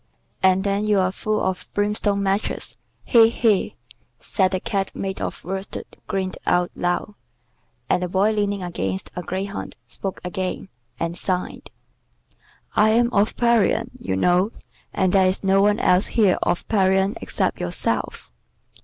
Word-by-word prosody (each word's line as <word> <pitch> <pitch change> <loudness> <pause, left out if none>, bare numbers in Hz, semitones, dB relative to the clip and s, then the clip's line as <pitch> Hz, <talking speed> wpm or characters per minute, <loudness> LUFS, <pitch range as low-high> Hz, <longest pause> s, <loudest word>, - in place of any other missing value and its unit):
And 190 0 +4
then 200 +1 0
you're 195 -3 +2
full 215 +2 -1
of 190 -1 -2
brimstone 205 -1 0
matches. 195 +2 -2 0.3
He! 225 -2 +6
he!" 225 -4 +1 0.6
and 190 -1 +5
the 185 - 0
Cat 195 0 -2
made 195 0 -4
of - - -4
worsted 190 +2 -5 0.2
grinned 190 -1 -2
out 180 0 +2
loud. 175 +4 -1 0.7
The 180 0 +1
Boy 195 +4 +2
leaning 205 -2 -1
against 95 - -3
a 180 - -3
greyhound 195 +3 -5
spoke 195 -1 -6
again, 185 +1 -4 0.3
and 170 0 -2
sighed: 180 0 -3 1.1
"I 215 - +5
am 235 +2 +3
of 205 +1 +2
Parian, 235 -4 +2
you 95 0 -2
know, 180 - +2 0.4
and 185 -2 +1
there 190 -1 +5
is 185 +2 -1
no 195 0 +4
one 205 +1 +3
else 180 +3 +3
here 210 -6 +3
of 175 - -1
Parian 190 -1 +2
except - - -1
yourself." - - -3
195 Hz, 145 wpm, -22 LUFS, 185-205 Hz, 1.1 s, He